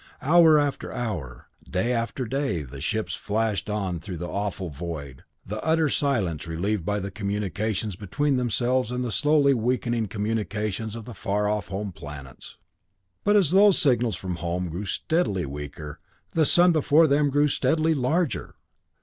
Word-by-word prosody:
Hour 160 +1 +6
after 145 -2 -1
hour, 90 - -5 0.2
day 105 +7 0
after 115 +2 -2
day 130 - -1
the 65 0 -9
ships 110 +7 -1
flashed 110 -1 -1
on 95 -5 -2
through 90 0 -7
the 90 +2 -5
awful 100 -3 -3
void, 70 -4 -7 0.2
the 105 +2 -5
utter 160 -1 +2
silence 100 - 0
relieved 90 +4 -1
by 105 +4 -1
the 100 0 -5
communications 105 0 -2
between 140 +10 -1
themselves 125 0 0
and 125 0 -2
the 120 - -3
slowly 145 +1 +4
weakening 120 -1 0
communications 105 0 -2
from 115 - -7
the 120 - -9
far 105 +1 -1
off 105 0 -1
home 100 +1 -4
planets. 70 -5 -10 0.7
But 205 +1 +3
as 185 -7 +4
those 195 +1 +6
signals 120 - +2
from 90 0 -4
home 85 +2 -2
grew 90 +5 -5
steadily 105 - 0
weaker, 75 +2 -7 0.3
the 160 -2 +3
sun 175 +4 +5
before 155 0 +4
them 145 0 +3
grew 145 +2 +3
steadily 160 +2 +2
larger. 155 +4 -1
110 Hz, 160 wpm, -25 LUFS, 90-140 Hz, 0.7 s, Hour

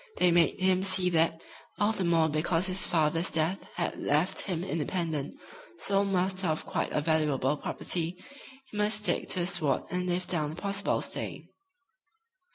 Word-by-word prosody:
They 180 - +3
made 170 +1 +2
him 185 0 +2
see 185 -1 +4
that, 165 0 +1 0.4
all 205 +1 +2
the 210 -4 -2
more 165 -2 +2
because 165 +3 0
his 185 0 +3
father's 165 +1 +1
death 165 +4 -1
had 175 - -3
left 150 +6 +2
him 180 -3 -3
independent 165 - -3 0.4
sole 200 -6 +1
master 190 -1 +1
of 155 -1 -2
quite - - -3
a 150 - 0
valuable 150 -3 +1
property 170 +3 -2 0.5
he 210 - -7
must 210 0 0
stick - - +3
to 185 - 0
the - - 0
sword 170 -7 +1
and 180 0 -2
live 180 +1 -1
down 155 -3 +1
the - - -9
possible 200 0 -1
stain. - - -4
175 Hz, 165 wpm, -28 LUFS, 160-190 Hz, 0.5 s, see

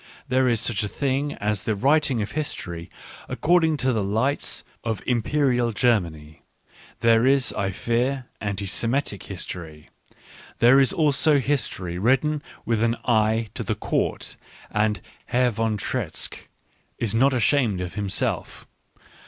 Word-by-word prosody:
There 130 0 +2
is 115 -2 +2
such 115 -2 0
a 105 - -1
thing 140 +5 -1
as 105 -1 -1
the 110 - -1
writing 135 0 +2
of 100 - -6
history 85 - -4 0.4
according 160 -1 +2
to 130 - +3
the 110 -3 0
lights 115 +9 -1 0.2
of 110 -4 -3
Imperial 125 0 +1
Germany; 85 -10 0 0.6
there 115 +1 +4
is, 135 -1 +3
I 100 -1 -1
fear, 125 +6 -1 0.2
anti 100 -1 -3
Semitic 115 +2 -1
history 85 -5 -7 0.3
— - - -20
there 125 +4 +6
is 135 -3 +5
also 150 -1 +3
history 110 -11 -2
written 135 +7 +2 0.2
with 115 -2 0
an 115 0 +1
eye 110 -1 +2
to - - -4
the - - -2
Court, - - -2 0.3
and 105 0 +1 0.3
Herr 125 0 +2
von 110 0 -1
Treitschke - - -2 0.5
is 110 -4 -1
not 130 +5 +4
ashamed 120 -5 +2
of 90 -1 -4
himself. 100 -2 -2
115 Hz, 140 wpm, -24 LUFS, 105-135 Hz, 0.6 s, there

